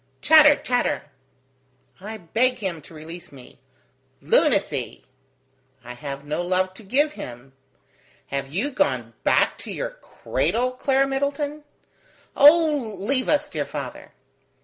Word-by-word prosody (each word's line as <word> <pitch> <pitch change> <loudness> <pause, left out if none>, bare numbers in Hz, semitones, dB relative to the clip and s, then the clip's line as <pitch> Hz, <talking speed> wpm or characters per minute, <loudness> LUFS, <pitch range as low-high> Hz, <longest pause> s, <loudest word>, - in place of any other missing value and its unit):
." - - -41
"Chatter! 305 -2 +8
chatter!" 245 -2 -1 1.0
"I 215 +3 -7
beg 230 +8 +1
him 185 -7 -4
to 150 - -16
release 165 +3 -10
me." 130 -2 -15 0.6
"Lunacy!" 195 - +1 0.8
"I 125 +1 -8
have 140 +2 -7
no 150 +3 -2
love 185 +1 0
to 205 - -14
give 285 +9 +1
him." 125 - -10 0.8
"Have 135 0 -4
you 215 - -1
gone 290 +2 -1
back - - +2
to - - -7
your - - -4
cradle, 255 - -2
Clara 270 +1 +1
Middleton?" 285 +2 -2 0.7
"Oh, 295 -6 +5
leave 255 +7 -1
us, 300 -1 +2
dear - - -3
father!" - - -7
225 Hz, 125 wpm, -23 LUFS, -, 1.0 s, Chatter